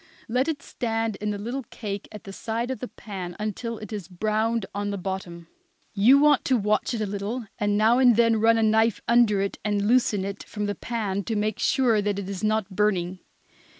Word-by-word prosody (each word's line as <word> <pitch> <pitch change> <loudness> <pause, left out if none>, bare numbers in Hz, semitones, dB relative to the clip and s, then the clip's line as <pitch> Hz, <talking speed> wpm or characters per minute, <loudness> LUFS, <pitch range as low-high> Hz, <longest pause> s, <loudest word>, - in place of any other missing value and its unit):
Let 250 +4 +1
it 320 -3 -3
stand 225 -2 -2
in 210 - -3
the 205 - -2
little 240 +7 -4
cake 205 -6 -5
at 210 -2 -10
the 195 - -9
side 230 +4 -3
of 260 - -4
the 250 - -5
pan 185 -7 -7
until 215 +2 -4
it 215 -1 -8
is 205 -4 -5
browned 215 +3 0
on 205 0 -2
the 200 - -3
bottom. 180 -3 -5 0.5
You 225 +7 +6
want 290 -1 +4
to 260 - +3
watch 210 +3 0
it 220 - -3
a - - +1
little, 205 +4 -4
and 205 0 +1
now 225 +4 +4
and 250 -3 +6
then 230 -1 +4
run 230 0 +5
a 225 - +2
knife 220 0 +3
under 235 -4 +4
it 200 - -3
and 205 -1 0
loosen 220 -5 +2
it 200 0 -5
from 210 -1 -5
the 205 - -1
pan, 205 -4 -3
to 225 - -2
make 215 +1 -1
sure 245 -6 +3
that 205 -1 -1
it 200 -2 -4
is 195 -1 -5
not 215 -2 0
burning. 185 -3 0
215 Hz, 215 wpm, -25 LUFS, 200-230 Hz, 0.5 s, You